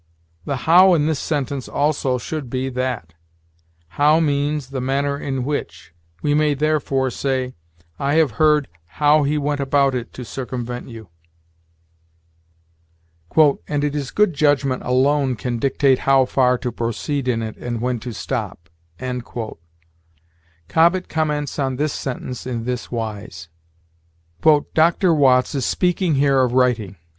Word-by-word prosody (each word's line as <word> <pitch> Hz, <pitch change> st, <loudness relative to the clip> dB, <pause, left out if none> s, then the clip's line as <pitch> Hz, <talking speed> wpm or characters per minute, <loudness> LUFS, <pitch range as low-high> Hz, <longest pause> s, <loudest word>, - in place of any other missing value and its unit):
The 140 Hz, -, -2 dB
how 180 Hz, +3 st, +7 dB
in 150 Hz, -2 st, +1 dB
this 155 Hz, -3 st, 0 dB
sentence 140 Hz, -3 st, -3 dB
also 140 Hz, -3 st, 0 dB
should 140 Hz, +2 st, -5 dB
be 130 Hz, +2 st, -2 dB
that. 125 Hz, -9 st, -3 dB, 0.8 s
How 150 Hz, -, +3 dB
means 145 Hz, -2 st, -1 dB
the 135 Hz, -2 st, -3 dB
manner 140 Hz, +2 st, 0 dB
in 135 Hz, -2 st, -3 dB
which. 90 Hz, -, -5 dB, 0.3 s
We 145 Hz, -, +2 dB
may, 150 Hz, -1 st, +2 dB
therefore, 140 Hz, -3 st, 0 dB
say, 130 Hz, 0 st, -2 dB, 0.5 s
"I 140 Hz, +2 st, 0 dB
have 160 Hz, -5 st, +3 dB
heard 150 Hz, -2 st, +4 dB, 0.3 s
how 150 Hz, +1 st, +4 dB
he 145 Hz, +1 st, 0 dB
went 145 Hz, 0 st, -1 dB
about 140 Hz, 0 st, +2 dB
it 125 Hz, -2 st, -4 dB
to 125 Hz, -, -8 dB
circumvent 125 Hz, -1 st, -5 dB
you." 110 Hz, -5 st, -11 dB, 2.6 s
"And 145 Hz, -1 st, -1 dB
it 145 Hz, -1 st, 0 dB
is 145 Hz, -3 st, -3 dB
good 210 Hz, -4 st, +2 dB
judgment 145 Hz, -3 st, +1 dB
alone 135 Hz, +1 st, +2 dB
can 120 Hz, +2 st, -3 dB
dictate 135 Hz, 0 st, +2 dB
how 135 Hz, -1 st, +4 dB
far 125 Hz, -1 st, +2 dB
to 125 Hz, 0 st, -4 dB
proceed 120 Hz, +4 st, -3 dB
in 115 Hz, -2 st, 0 dB
it 110 Hz, -1 st, -5 dB
and 120 Hz, -1 st, -4 dB
when 125 Hz, 0 st, -1 dB
to 125 Hz, +2 st, -6 dB
stop." 105 Hz, -9 st, -5 dB, 2.0 s
Cobbett 170 Hz, -, +2 dB
comments 150 Hz, -2 st, -2 dB
on 135 Hz, -2 st, 0 dB
this 150 Hz, +2 st, -1 dB
sentence 125 Hz, -1 st, -5 dB
in 120 Hz, -3 st, -3 dB
this 125 Hz, 0 st, -4 dB
wise: 105 Hz, -7 st, -6 dB, 1.2 s
"Dr. 170 Hz, +2 st, +3 dB
Watts 130 Hz, -3 st, +3 dB
is 135 Hz, -3 st, -1 dB
speaking 180 Hz, -3 st, +1 dB
here 135 Hz, -1 st, +3 dB
of 125 Hz, -2 st, +1 dB
writing. 120 Hz, -6 st, +1 dB
135 Hz, 140 wpm, -20 LUFS, 125-150 Hz, 2.6 s, how